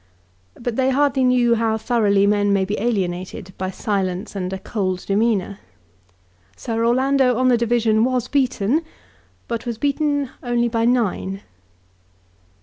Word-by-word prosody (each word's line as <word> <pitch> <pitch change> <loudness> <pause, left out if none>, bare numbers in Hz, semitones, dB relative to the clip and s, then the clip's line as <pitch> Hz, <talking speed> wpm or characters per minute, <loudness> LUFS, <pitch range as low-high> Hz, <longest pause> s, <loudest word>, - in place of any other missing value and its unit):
But 235 -1 -3
they 265 0 +2
hardly 270 -1 +2
knew 250 -2 +3
how 225 -1 +1
thoroughly 210 -4 +2
men 205 0 +2
may 195 -1 +2
be 205 +2 -2
alienated 190 -3 -3
by 185 0 -2
silence 190 -1 -3
and 185 -1 -3
a 190 - -3
cold 185 -2 -3
demeanour. 200 -1 0 1.0
Sir 230 -1 -3
Orlando 260 +1 +2
on 255 0 +3
the 245 - +5
division 230 -2 +2
was 250 -1 0
beaten, 260 0 +1 0.7
but 235 +1 -4
was 235 -2 -3
beaten 285 0 0
only 240 -1 0
by 230 0 0
nine. 205 -5 0
230 Hz, 140 wpm, -21 LUFS, 200-250 Hz, 1.0 s, the